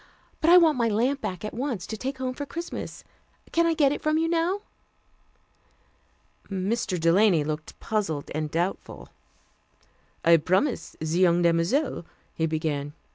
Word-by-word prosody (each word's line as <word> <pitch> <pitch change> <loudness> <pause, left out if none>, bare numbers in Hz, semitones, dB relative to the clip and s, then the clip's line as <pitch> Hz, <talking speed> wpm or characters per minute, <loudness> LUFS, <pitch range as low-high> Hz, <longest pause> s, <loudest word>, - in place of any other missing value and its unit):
But 325 - +2
I 355 - +9
want 320 -6 +4
my 235 - +3
lamp 250 +6 +1
back 185 +2 -4
at 215 - -5
once, 240 -7 -3
to 220 - -5
take 265 +5 -4
home 255 0 -3
for 285 - -5
Christmas. 335 +4 -6 0.5
Can 335 0 +3
I 330 - +1
get 285 -3 +4
it 290 - -3
from 310 0 +1
you 325 +1 +1
now?" 340 +4 0 1.9
Mr. 195 0 -1
Delany 170 0 +4
looked 155 +1 -5
puzzled 195 -10 -2
and 155 0 -2
doubtful. 175 +5 -3 1.2
"I 165 0 +7
promised 185 - 0
the 160 - -4
young 175 +1 +3
demoiselle 170 - +1 0.2
" - - -37
he 160 - 0
began. 150 -2 -2
210 Hz, 155 wpm, -26 LUFS, -, 1.9 s, I